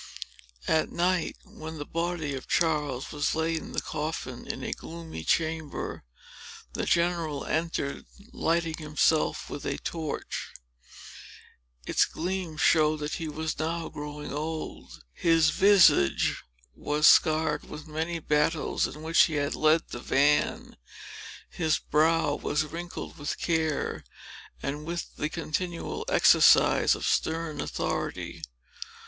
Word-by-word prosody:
At 160 - +2
night, 175 -1 0
when 160 0 -9
the 145 - -5
body 165 -3 -2
of 135 - -6
Charles 150 -6 0
was 145 +1 0
laid 160 +1 0
in - - -10
the - - -1
coffin, 150 -5 -4
in - - -5
a - - -2
gloomy 165 - -8
chamber, 160 - -1 0.7
the - - -2
general 170 -4 +1
entered, 160 -3 -2 0.3
lighting 165 -1 0
himself 155 0 +1
with 145 - -7
a - - -2
torch. 160 -3 -5 1.3
Its - - +3
gleam 180 -2 -4
showed 155 -1 +4
that 150 +1 -3
he 160 - -3
was 155 +1 -4
now 165 +1 -2
growing 150 0 -7
old; 155 +2 -5
his 165 -2 +3
visage 190 - +4 0.3
was 150 - 0
scarred 155 -1 +5
with 150 0 -8
the 155 - -14
many 165 +2 -2
battles 150 0 +1
in 150 +3 -10
which 165 +5 +5
he 160 -3 -3
had 145 0 0
led 155 +1 +2
the 120 - -6
van; 145 +4 +1 0.7
his 160 -3 0
brow 160 0 +2
was 150 +1 0
wrinkled 170 +1 -7
with 145 - -3
care, 160 -3 -1 0.6
and 145 +2 -3
with 170 0 -5
the 150 - -1
continual 170 +1 -3
exercise - - +5
of - - -5
stern 160 -1 0
authority. - - -3
160 Hz, 130 wpm, -28 LUFS, 150-165 Hz, 1.3 s, scarred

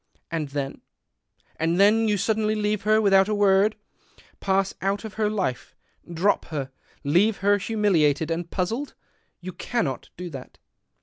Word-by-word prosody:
And 160 -3 -2
then? 140 -1 -4 0.8
And 165 +3 0
then 220 +3 +5
you 210 -1 +2
suddenly 215 +2 0
leave 210 -1 -1
her 215 +1 +3
without 195 -2 +4
a 215 - 0
word, 205 +1 +3 0.6
pass 195 0 0
out 200 +3 -1
of 215 - -7
her 215 -1 0
life, 190 - -3 0.4
drop 175 +5 +1
her, 140 -4 -5 0.3
leave 180 +9 +3
her 205 0 +4
humiliated 170 -8 +1
and 170 +1 -3
puzzled. 225 +10 -3 0.5
You 185 +1 -7
cannot 170 - -3
do 175 0 -6
that." 135 -3 -10
195 Hz, 145 wpm, -24 LUFS, 165-210 Hz, 0.8 s, then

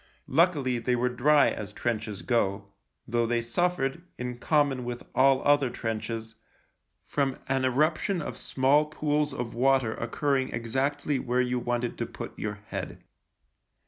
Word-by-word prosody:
Luckily 140 -5 +2
they 125 +1 +1
were 125 +1 +1
dry, 145 +4 +4
as 105 -1 -6
trenches 110 -3 -3
go, 100 -4 0 0.4
though 120 0 +1
they 120 0 +1
suffered, 170 +2 0 0.2
in 125 0 -5
common 140 -3 +2
with 120 0 -5
all 135 0 +4
other 145 -2 +4
trenches, 115 -1 -4 0.7
from 135 -2 0
an 135 0 +1
eruption 155 +8 +1
of 150 - -5
small 140 +3 +2
pools 150 -1 0
of 120 -2 -4
water 130 -2 +2
occurring 130 +3 0
exactly 135 +4 -1
where 125 +1 0
you 125 0 +1
wanted 120 0 -2
to - - -1
put - - -7
your 105 -1 -4
head. - - -5
130 Hz, 145 wpm, -28 LUFS, 120-145 Hz, 0.7 s, dry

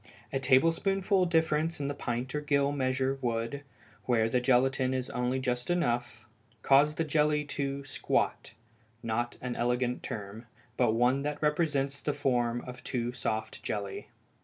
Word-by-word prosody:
A 135 - +1
tablespoonful 180 +8 +3
difference 160 -1 +1
in 140 - -2
the 145 - -2
pint 125 -1 -3
or 150 - -1
gill 140 -1 +2
measure 130 -1 0
would, 115 +3 -2 0.4
where 115 -3 +3
the 125 +2 +1
gelatine 130 +1 +2
is 130 -1 -3
only 125 +2 0
just 125 0 -2
enough, 120 -10 -1 0.4
cause 145 +2 +5
the 165 - 0
jelly 150 -1 +2
to 140 -1 -3
"squat" 135 - -1 0.5
not 120 +1 -2
an 125 -1 -3
elegant 125 +1 0
term, 105 +3 -7 0.3
but 120 -3 +3
one 125 +4 +3
that 150 +1 -3
represents 150 -3 0
the 150 - -1
form 120 -4 0
of 125 0 -9
a - - -15
too 120 -1 -2
soft 110 -2 -3
jelly. 100 -2 -4
130 Hz, 155 wpm, -30 LUFS, 120-145 Hz, 0.5 s, cause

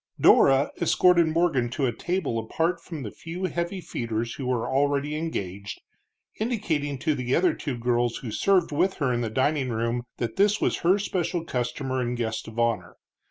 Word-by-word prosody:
Dora 135 +1 +5
escorted 170 0 +4
Morgan 160 -7 +1
to 140 - +2
a 125 - +1
table 175 -10 -1
apart 165 +10 -1
from 160 -5 -7
the 105 - -5
few 170 +3 -7
heavy 180 +1 -2
feeders 115 -7 -3
who 135 - -5
were 125 -3 0
already 145 +2 +1
engaged, 100 - -4 0.6
indicating 170 - -1
to 155 +4 0
the 125 -2 -1
other 175 -2 +3
two 135 -5 -4
girls 120 0 0
who 120 - -6
served 190 - +2
with 180 +6 +1
her 135 -5 0
in 120 - 0
the 115 - -1
dining 130 +3 +1
room 115 +1 -1 0.2
that 115 -2 -3
this 205 +1 +3
was - - +1
her 180 +4 +4
special 180 -3 -2
customer 130 0 -2
and 120 0 -2
guest 110 -2 -3
of 110 0 -10
honor. 115 -1 0
140 Hz, 180 wpm, -26 LUFS, 120-170 Hz, 0.6 s, Dora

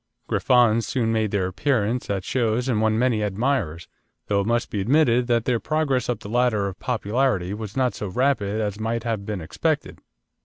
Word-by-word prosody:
Griffons 115 -3 +3
soon 120 -6 0
made 110 -1 +1
their 100 -2 0
appearance 115 +4 -1
at 100 -2 -1
shows 120 +1 0
and 115 -5 +1
won 110 0 +2
many 120 -2 +2
admirers, 105 - -1 0.4
though 100 -1 +1
it 100 - -3
must 120 0 0
be 100 - -1
admitted 125 +1 +3
that 120 -1 +1
their 120 -2 +1
progress 140 -5 0
up 120 -4 -2
the - - -8
ladder 115 -3 +1
of 95 - -7
popularity 110 -5 0
was 105 +2 -7
not 130 -2 +2
so 105 - -5
rapid 110 -1 0
as 105 -1 -2
might 115 +1 -2
have 110 -4 -3
been 105 -4 -3
expected. 80 - -2
115 Hz, 190 wpm, -23 LUFS, 105-125 Hz, 0.4 s, Griffons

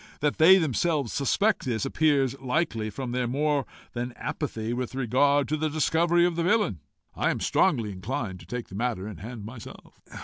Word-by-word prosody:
That 150 0 0
they 180 +4 +8
themselves 155 - 0
suspect 200 +10 +1
this, 120 -2 -1
appears 135 -2 +2
likely 130 -5 -1
from 120 +4 -5
their 125 0 -1
more 145 +2 0 0.3
than 120 +1 -4
apathy 115 -5 -4
with 125 +1 -4
regard 135 +3 +2
to 155 - 0
the 155 +1 0
discovery 170 +3 +2
of 175 -1 0
the 170 - -1
villain. 200 - +2 0.3
I - - 0
am - - -1
strongly 110 -3 +2
inclined 100 0 -4
to 80 - -14
take 120 +4 -5
the - - -13
matter 110 -3 -2
in 105 -5 -7
hand 110 +3 -8
myself." 115 +1 -11
130 Hz, 180 wpm, -27 LUFS, 115-155 Hz, 0.3 s, they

